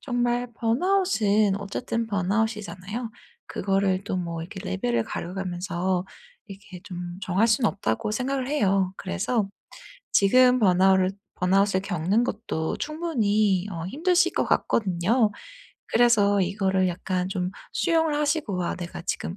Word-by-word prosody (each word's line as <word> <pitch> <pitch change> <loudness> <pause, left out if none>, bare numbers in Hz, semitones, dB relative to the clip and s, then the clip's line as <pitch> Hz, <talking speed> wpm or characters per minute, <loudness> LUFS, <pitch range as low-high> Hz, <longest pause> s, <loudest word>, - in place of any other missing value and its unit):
정말 245 -1 -1
번아웃은 230 - +2
어쨌든 230 +3 -3
번아웃이잖아요. 210 +2 -2 0.4
그거를 195 -1 0
또 185 - -2
뭐 170 -2 -3
이렇게 190 +2 -8
레벨을 115 +5 -1
가려 175 +2 -5
가면서 180 0 -2 0.4
이렇게 195 -3 -11
좀 175 -2 -7
정할 190 +4 +2
수는 220 -1 +3
없다고 185 - -2
생각을 260 +2 -2
해요. 195 -9 +1
그래서 195 - -1 0.6
지금 250 +5 +5
번아우를 190 -1 +4 0.2
번아웃을 190 +1 +2
겪는 195 +3 0
것도 200 -9 -3
충분히 215 - 0
어 165 -2 -5
힘드실 355 - +2
것 - - +1
같거든요. 210 +3 +1 0.6
그래서 210 -4 +4
이거를 190 0 +1
약간 180 +1 -2
좀 185 -1 -2 0.2
수용을 325 -2 +1
하시고 290 - 0
'아 - - -2
내가 175 -1 -7
지금 180 0 -3
200 Hz, 300 characters per minute, -25 LUFS, 185-235 Hz, 0.6 s, 지금